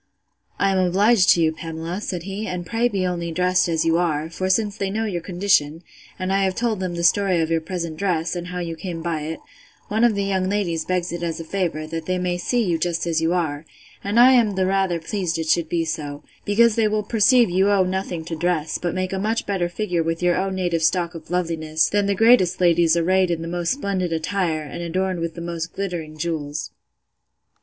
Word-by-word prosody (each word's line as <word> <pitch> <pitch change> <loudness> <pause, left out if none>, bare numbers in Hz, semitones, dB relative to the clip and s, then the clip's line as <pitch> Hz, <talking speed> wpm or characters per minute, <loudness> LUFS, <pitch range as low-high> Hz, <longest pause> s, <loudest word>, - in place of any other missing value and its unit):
I 195 - +2
am 190 - +1
obliged 190 +3 +3
to 170 - 0
you, 160 - +3
Pamela, 165 +3 -5
said 180 -5 -4
he, 200 +3 -5
and 180 -1 -4
pray 230 +7 +1
be 195 -5 -1
only 170 -2 -2
dressed 180 +1 +2
as 165 -1 0
you 165 0 +3
are; 160 -2 -1
for 185 +3 -2
since 205 +1 +1
they 195 -2 -2
know 220 +3 -1
your 180 -5 -3
condition, 175 -3 +1 0.3
and 185 0 -2
I 195 - +2
have 190 -1 0
told 230 -4 -1
them 185 -2 -3
the 170 - -3
story 185 +1 +3
of 165 0 0
your 165 0 +1
present 170 -2 -5
dress, 175 -3 -1
and 175 0 -5
how 180 0 -6
you 170 -2 -4
came 165 -1 -6
by 165 -3 -2
it, 160 +2 -5 0.5
one 220 +2 +1
of 235 -3 +4
the 200 - 0
young 190 -1 0
ladies 175 -6 -1
begs 180 -1 -1
it 175 0 -5
as 170 -1 -3
a - - -5
favour, 165 -3 -2
that 160 0 -6
they 185 0 0
may 180 -1 -1
see 240 +5 0
you 170 -5 0
just 170 0 -1
as 165 -1 0
you 165 +1 +1
are: 155 -4 -1 0.4
and 205 +4 +1
I 250 +2 +8
am 230 -6 +3
the 190 0 +1
rather 190 -2 +1
pleased 175 -1 -2
it 160 -1 -3
should 165 -1 +2
be 165 -1 0
so, 150 -3 -5 0.2
because 230 +3 +4
they 220 0 +2
will 210 0 0
perceive 230 +1 +4
you 190 +3 +3
owe 200 -2 +4
nothing 185 -3 -3
to 165 - -4
dress, 165 -2 -1
but 175 0 -2
make 185 0 -2
a 190 - -1
much 220 +3 -1
better 185 -4 -1
figure 180 -2 -1
with 165 +1 -2
your 175 -1 +3
own 190 +1 -1
native 175 -3 -1
stock 170 +1 +1
of 165 - -10
loveliness, 160 -3 0
than 205 -1 +1
the 200 - +1
greatest 225 -4 +4
ladies 170 -2 +4
arrayed 185 +2 +2
in 165 -1 -2
the - - -5
most 175 +2 -1
splendid 195 -9 -2
attire, 165 -1 -1
and 150 +3 -7
adorned 185 +2 -1
with 165 0 -3
the 170 - -7
most 170 -1 -5
glittering 170 -6 -5
jewels. 155 -2 -3
180 Hz, 230 wpm, -22 LUFS, 165-195 Hz, 0.5 s, I